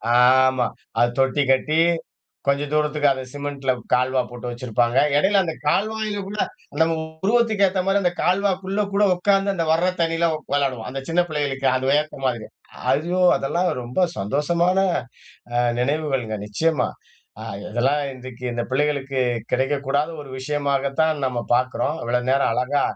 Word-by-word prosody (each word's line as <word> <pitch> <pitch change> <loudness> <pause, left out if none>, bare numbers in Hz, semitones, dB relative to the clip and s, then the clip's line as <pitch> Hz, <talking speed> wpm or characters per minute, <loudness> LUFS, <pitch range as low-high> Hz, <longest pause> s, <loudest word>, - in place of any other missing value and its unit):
ஆமா. 130 0 +5 0.3
அது 120 0 +4
தொட்டி 135 +2 +2
கட்டி, 155 +4 +2 0.7
கொஞ்ச 140 +1 +2
தூரத்துக்கு 150 -1 +2
அத 130 -1 -3
சிமெண்ட்ல 140 -2 -2 0.2
கால்வா 130 +1 +2
போட்டு 120 0 -7
வெச்சிருப்பாங்க. 120 0 0 0.2
எடையில 195 +5 +3
அந்தக் 165 -4 -5
கால்வாய்ல 215 +2 -1
உள்ள 210 +2 -6 0.4
நம்ம 165 0 +3 0.3
உருவத்துக்கு 220 -2 +3
ஏத்த 185 0 0
மாரி 195 +1 +3
அந்தக் 175 -1 -1
கால்வாக்குள்ள 195 +1 +1
கூட 205 +1 +3
உக்காந்து 195 +2 +2
அந்த 165 -3 -1
வர்ற 170 +3 +3
தண்ணியில 165 0 +1
உக் 155 -2 -7
வெளாடுவோம். 130 -5 -1
அந்தச் 135 +1 -6
சின்னப் 175 +1 +2
பிள்ளைகளுக்கு 140 -3 -1
அது 130 +1 0
வியர்த்தமா 140 -3 +1
இருக்கு. 110 -2 -9 0.4
ஐயோ 170 +7 0 0.2
அதெல்லாம் 175 +6 0
ரொம்ப 120 +8 -4 0.2
சந்தோஷமான 170 - +1 0.8
அ - - +2 0.2
நினைவுகள்ங்க. 135 -4 -1
நிச்சயமா. 140 +5 0 0.5
அ - - -6 0.3
இதெல்லாம் 135 +5 +1
இன்றைக்கு 125 -1 -9
இந்த 120 0 -2
பிள்ளைகளுக்குக் 130 -4 0
கிடைக்கக் 140 +2 0
கூடாத 145 +4 +1
ஒரு 135 - -12
விஷயமாகத் 140 0 -1
தான் 155 -3 0
நம்ம 125 -2 -2 0.2
பாக்குறோம். 130 +4 -1
இவ்வளவு 125 +1 -1
நேரம் 135 -3 +2
அழகா 135 +3 +1
அ. - - -20
145 Hz, 150 wpm, -22 LUFS, 130-170 Hz, 0.8 s, ஆமா